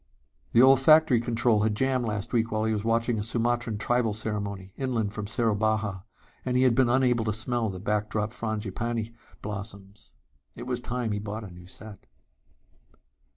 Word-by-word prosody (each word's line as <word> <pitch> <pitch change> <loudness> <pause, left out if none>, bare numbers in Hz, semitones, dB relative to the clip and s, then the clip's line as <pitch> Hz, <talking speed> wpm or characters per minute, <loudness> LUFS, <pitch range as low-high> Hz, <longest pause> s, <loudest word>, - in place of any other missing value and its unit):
The 120 - +7
olfactory 135 0 +6
control 115 -2 +2
had 105 0 +1
jammed 130 +1 0
last 105 +1 -3
week 115 -1 +1
while 110 0 0
he 110 - +1
was 105 -1 -2
watching 115 0 +1
a - - -2
Sumatran 120 0 -1
tribal 115 0 +1
ceremony, 100 -3 -4
inland 115 -6 -2
from 105 -1 -5
Soerabaja, 110 -3 0 0.4
and 125 -1 0
he 130 - +4
had 130 -2 +4
been 125 0 +3
unable 125 -2 +2
to 110 - 0
smell 115 +1 -1
the 95 -1 -6
backdrop 105 +1 -1
frangipani 110 +1 -3 0.3
blossoms. 100 -1 -8 0.4
It 120 - -8
was 125 -1 -2
time 120 -2 -3
he 105 - -1
bought 105 +2 -5
a 100 - -9
new 90 0 -13
set.... 100 +1 -12
110 Hz, 165 wpm, -27 LUFS, 105-120 Hz, 0.4 s, The